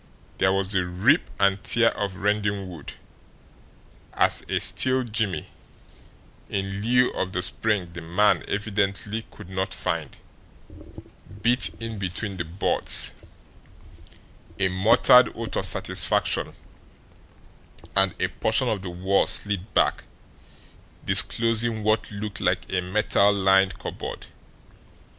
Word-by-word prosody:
There 95 - +2
was 95 0 -1
the 95 -3 +1
rip 95 - +1
and 100 0 +1
tear 115 0 +3
of 100 -2 -5
rending 100 0 -2
wood, 85 -5 -10 1.2
as - - +2
a - - 0
steel 130 0 +4
jimmy, 110 -5 -2 1.0
in 95 0 -4
lieu 125 +3 +2
of 95 0 -4
the 90 - -1
spring 95 -2 -2
the 85 - -8
man 90 +6 +1
evidently 100 +1 -3
could 105 - -14
not 95 +1 -4
find, 85 -5 -4 1.3
bit 120 +2 +2
in 115 -2 -6
between 95 +1 -5
the 85 - -4
boards, 85 +5 +1 1.4
a 95 -1 0
muttered 110 +6 +4
oath 115 -1 -5
of - - -2
satisfaction, - - +1 1.4
and 95 -2 +2
a - - 0
portion 115 +3 0
of 105 -4 -3
the 95 - -7
wall 95 +3 0
slid 100 0 0
back, - - +1 1.0
disclosing 115 -1 +5
what 110 0 0
looked 105 0 -7
like 90 -2 -1
a 90 - 0
metal 100 +2 +1
lined 95 -1 +2
cupboard. - - -8
100 Hz, 120 wpm, -23 LUFS, 95-110 Hz, 1.4 s, disclosing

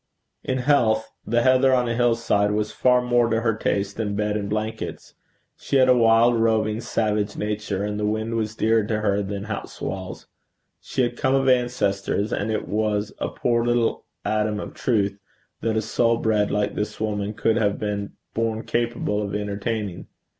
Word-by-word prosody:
In 130 - -1
health, 120 -5 +2 0.2
the 120 +1 +2
heather 130 0 +5
on 125 -1 +1
a 115 - 0
hill 120 0 +3
side 105 -3 +1
was 105 0 -1
far 125 -1 +3
more 120 -1 +2
to 115 0 +1
her 115 -1 +2
taste 100 -2 -1
than 105 -2 -2
bed 105 0 0
and 100 -1 -2
blankets. 110 +1 -4 0.4
She - - -3
had 130 -1 +6
a 125 - +7
wild, 115 0 +4
roving, 110 -1 +1
savage 105 -3 -1
nature, 105 -2 -2
and 105 0 -3
the 105 - 0
wind 110 +2 -1
was 110 -1 -2
dearer 110 0 +2
to 105 0 -1
her 100 -1 +1
than 100 0 -4
house 105 -1 -6
walls. 95 -1 -5 0.5
She 130 - -1
had 120 - -2
come 135 -2 +2
of 135 0 +1
ancestors 110 -5 +1
and 105 - -1
it 110 - -2
was 105 0 -1
a - - -1
poor 115 -1 0
little 120 -1 +1 0.2
atom 105 -1 0
of - - -7
truth 100 -5 0 0.4
that 110 -1 0
a 110 - 0
soul 115 +1 +2
bred 105 -2 +1
like 105 0 0
this 105 0 -4
woman 105 -1 -2
could 110 0 +1
have 105 -3 +1
been 100 -1 -3 0.2
born 115 0 -1
capable 120 -3 -1
of 100 -1 -3
entertaining. 105 -1 -3
110 Hz, 185 wpm, -23 LUFS, 105-115 Hz, 0.5 s, a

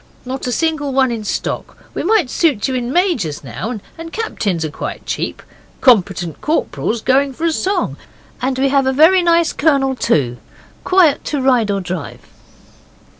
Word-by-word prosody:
'Not 260 +1 -4
a - - -1
single 310 0 0
one 260 -2 +3
in 225 -2 -4
stock. - - -4 0.2
We - - -3
might 380 - +2
suit 290 -11 +1
you 265 - -2
in 245 -1 -2
majors 265 - 0
now 220 - -5 0.2
and 330 0 -7
captains 200 - -2
are 155 - -4
quite - - -6
cheap. - - -3 0.4
Competent 190 - +2
corporals 240 -7 -1
going 270 +1 +2
for 325 - -4
a 335 - +3
song. 390 +5 -1 0.4
And 260 +1 -1
we 270 +1 +2
have 275 -1 +2
a 265 - +2
very 325 +7 +6
nice 335 -1 +3
colonel, 275 -3 +2
too 130 - 0 0.5
quiet 365 -5 +3
to 295 - -1
ride 250 -5 +2
or 200 -1 0
drive. 180 -4 -6
265 Hz, 170 wpm, -17 LUFS, 215-320 Hz, 0.5 s, very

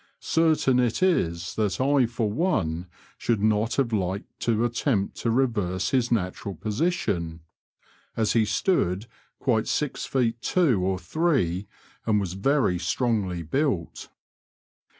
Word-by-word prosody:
Certain 155 -6 +2
it 125 +7 +1
is 85 - +1
that 105 -3 -1
I 135 -1 +3
for 115 -1 -1
one 95 - 0 0.3
should 115 -3 +1
not 110 +1 +2
have 120 -3 0
liked 95 -1 -3
to 115 0 +1
attempt 120 -3 0
to 115 - -1
reverse 105 -7 0
his 125 -3 +1
natural 100 -2 -1
position, 100 - -1 0.8
as 110 -1 +2
he 115 - +4
stood 105 - 0 0.3
quite 115 -5 +1
six 150 -3 -2
feet 120 -3 0
two 140 - +2
or 95 0 0
three, 105 - 0 0.4
and 105 -2 +3
was 95 -3 -3
very 95 -2 +1
strongly 95 -2 -1
built. 100 - -2
110 Hz, 130 wpm, -26 LUFS, 95-130 Hz, 0.8 s, he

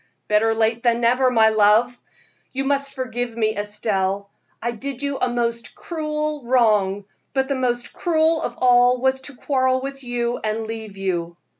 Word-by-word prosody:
"Better 220 +1 +2
late 225 +1 +1
than 235 -1 +2
never, 250 +2 +3
my 225 -3 +5
love. 220 +3 +4 0.6
You 270 +1 -2
must 275 0 0
forgive 245 -2 -4
me, 220 -1 +1
Estelle. 200 -1 -2 0.3
I 235 - -2
did 270 +3 -6
you 280 -1 -2
a 255 - +1
most 235 -1 -2
cruel 305 -3 -3
wrong, 210 -5 +2 0.3
but 265 0 +1
the 280 - 0
most 245 -2 -2
cruel 320 -1 +1
of 240 - -3
all 245 0 +5
was 265 +1 +1
to 280 0 -11
quarrel 260 -1 +1
with 275 +1 -7
you 245 -1 -2
and 220 +1 -2
leave 220 -2 -7
you." 175 -3 -3
240 Hz, 165 wpm, -22 LUFS, 220-265 Hz, 0.6 s, my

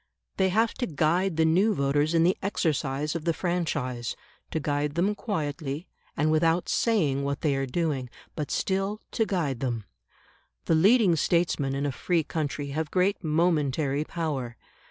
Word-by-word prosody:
They 190 -1 +3
have 225 +4 +2
to 245 - 0
guide 165 +3 +1
the 160 - +4
new 190 +7 +3
voters 145 +3 +1
in 165 - +5
the 180 +3 +3
exercise 150 -6 -1
of 165 -2 -4
the 165 -1 0
franchise; 150 -9 -2 0.3
to 160 - -2
guide 145 0 -1
them 190 +5 +2
quietly, 155 - -3 0.3
and 155 +2 +2
without 165 +2 +2
saying 155 - +1
what 140 0 -2
they 150 -3 +2
are 135 0 -1
doing, 140 -3 -1 0.3
but 150 -3 -3
still 195 +2 -1
to 225 - 0
guide 150 - -1
them. 120 -4 -2 0.8
The - - +2
leading 195 +2 +5
statesmen 160 -4 +1
in 140 +1 -1
a 145 - 0
free 170 +4 0
country 145 -2 -3
have 155 +2 -2
great 185 +3 +1
momentary 150 -3 +1
power. 145 -8 -3
160 Hz, 160 wpm, -27 LUFS, 140-180 Hz, 0.8 s, in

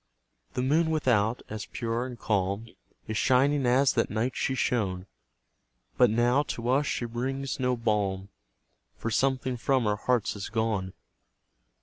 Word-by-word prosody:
The 125 - 0
moon 160 +5 +2
without, 120 -7 +1
as 110 -1 -6
pure 115 +1 -2
and 125 -2 -8
calm, 100 0 -1 0.4
Is 110 0 -2
shining 135 +1 +3
as 130 +2 +4
that 115 - +1
night 115 +4 -1
she 130 - -1
shone; 95 -8 -1 0.9
But 125 - +5
now, 120 +5 +3
to 120 -4 -4
us, 140 +3 +2
she 120 - -1
brings 130 +4 -3
no 125 -1 +1
balm, 100 -4 -1 0.7
For 115 - -3
something 130 0 0
from 130 0 +1
our 105 0 +1
hearts 120 -1 0
is 100 - -5
gone. 110 -4 -1
120 Hz, 145 wpm, -28 LUFS, 110-130 Hz, 0.9 s, But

